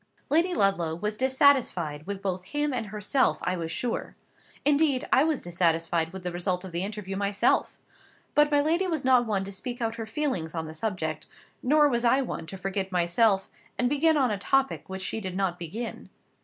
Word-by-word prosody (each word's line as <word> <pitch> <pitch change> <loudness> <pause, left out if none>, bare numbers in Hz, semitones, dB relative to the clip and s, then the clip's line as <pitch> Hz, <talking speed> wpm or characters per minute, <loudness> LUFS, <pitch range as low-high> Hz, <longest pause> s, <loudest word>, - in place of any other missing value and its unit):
Lady 335 +4 +3
Ludlow 175 -5 +1
was 210 +5 -3
dissatisfied 250 - +2
with 200 -1 -5
both 185 -2 -2
him 295 +7 -1
and 230 -4 -2
herself, 210 +6 +1
I 180 - 0
was 165 -2 -4
sure. 230 +8 -3 0.5
Indeed, 290 -2 +3
I 265 - +6
was 310 -3 0
dissatisfied 165 -1 0
with 190 -1 -8
the 180 - -2
result 180 +1 -2
of 190 - -8
the 170 +1 -1
interview 200 -1 -5
myself. 200 0 +1 0.6
But 295 0 +4
my 290 -1 +3
lady 335 +6 +1
was 315 -6 -2
not 250 -2 +4
one 200 -3 0
to 195 - -7
speak 240 +5 -6
out 230 -1 -2
her 225 -1 -5
feelings 220 - -2
on 160 -1 -2
the 155 - -8
subject; 160 -4 -3 0.3
nor 295 +3 +4
was 240 -3 0
I 245 +3 +4
one 165 -9 -5
to 195 - -7
forget 195 0 -3
myself, 190 +3 +2 0.3
and 245 0 +2
begin 310 +3 +3
on 260 -5 +2
a 205 - -2
topic 270 +2 0
which 190 0 -5
she 220 - -3
did 185 -2 -4
not 185 -3 -1
begin. 210 +8 -6
205 Hz, 195 wpm, -27 LUFS, 180-260 Hz, 0.6 s, I